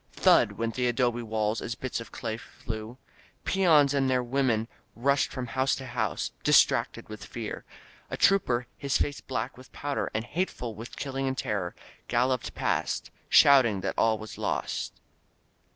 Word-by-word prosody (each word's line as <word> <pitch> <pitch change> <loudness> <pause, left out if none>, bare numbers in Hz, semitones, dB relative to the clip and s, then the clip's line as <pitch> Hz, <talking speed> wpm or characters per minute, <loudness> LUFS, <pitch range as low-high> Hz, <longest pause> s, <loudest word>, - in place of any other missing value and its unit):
Thud! - - +4
went 115 0 -2
the 125 +1 0
adobe 120 -1 +1
walls 110 -1 -1
as 115 - -4
bits 130 0 -4
of 115 - -11
clay 115 -3 -4
flew. 110 +1 -7 0.5
Peons 155 -7 +4
and 135 -2 +2
their 125 -1 +2
women 120 -3 +1 0.3
rushed 140 +4 +2
from 130 -2 -4
house 130 +2 +1
to 135 - -7
house, 120 -5 -2
distracted - - +3
with 110 -2 -8
fear. 110 +1 -6 0.4
A - - -4
trooper, 125 -11 +3
his 140 -1 +1
face 145 - -1
black 130 -1 -4
with 130 - -15
powder 145 -1 -2
and 110 +1 -1
hateful 145 -7 -3
with 115 +4 -9
killing 135 -1 -3
and 130 0 -2
terror, 100 -8 -2 0.3
galloped 125 +1 0
past, - - -1 0.2
shouting 120 -8 +6
that 95 - -2
all 110 -1 +3
was 110 0 -9
lost. - - -2
125 Hz, 160 wpm, -28 LUFS, 110-135 Hz, 0.5 s, shouting